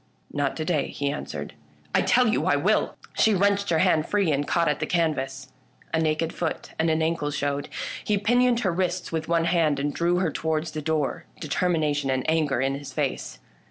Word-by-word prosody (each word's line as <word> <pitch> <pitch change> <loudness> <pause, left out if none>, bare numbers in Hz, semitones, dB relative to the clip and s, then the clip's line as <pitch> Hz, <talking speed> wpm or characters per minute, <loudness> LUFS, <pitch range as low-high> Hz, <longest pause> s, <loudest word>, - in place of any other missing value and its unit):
" - - -26
Not 145 -1 -1
to 155 - -2
day," 155 -5 +1
he 140 0 -2
answered. - - -6 0.2
" - - -32
I - - +4
tell 250 -2 +4
you 220 - +1
I - - +4
will! - - +1
" - - -23
She 220 -2 +5
wrenched 200 +1 +2
her 165 - +3
hand 160 -2 +3
free 200 -6 +2
and 145 0 0
caught 170 -1 +2
at 150 - +1
the - - -2
canvas. 135 -6 -1 0.4
A 160 - +2
naked 160 +1 0
foot 165 -2 -3
and 160 +1 +2
ankle 160 -1 0
showed. 145 -1 -2 0.3
He 210 - +1
pinioned 240 +3 +3
her 190 -6 +1
wrists 180 +1 -1
with 160 -1 -2
one 170 -1 +2
hand 165 -5 +2
and 145 +1 -1
drew 170 +1 +1
her 180 +1 +1
towards 160 0 -1
the 155 - -4
door, 155 -2 -1
determination 150 -3 0
and 130 -1 0
anger 155 -5 +1
in 135 +1 +1
his 140 0 -6
face. - - -3
160 Hz, 210 wpm, -25 LUFS, 145-175 Hz, 0.4 s, She